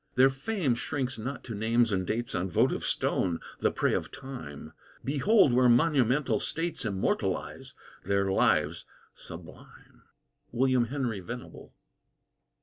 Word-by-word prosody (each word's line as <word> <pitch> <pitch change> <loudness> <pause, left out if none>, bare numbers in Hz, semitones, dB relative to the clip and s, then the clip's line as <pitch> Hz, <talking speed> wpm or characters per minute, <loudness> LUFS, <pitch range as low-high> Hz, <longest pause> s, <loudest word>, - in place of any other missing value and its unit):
Their 130 +1 +6
fame 145 - -1
shrinks 130 0 -3
not 135 +6 -5
to 115 - -6
names 115 +2 +2
and 95 -2 -1
dates 120 +1 -2
On 90 +1 -1
votive 85 - +1
stone, 85 -3 0 0.2
the - - +2
prey - - 0
of - - -2
time; 80 - -9 0.3
Behold 150 - +4
where 125 0 +5
monumental 130 -2 +3
States 165 -5 -2
Immortalize 100 -3 -2 0.3
their 100 0 +1
lives - - +2 0.3
sublime! - - -13 0.5
WILLIAM 125 0 +2
HENRY 120 -4 -2
VENABLE. 120 +7 -9
120 Hz, 125 wpm, -29 LUFS, 105-135 Hz, 0.5 s, Their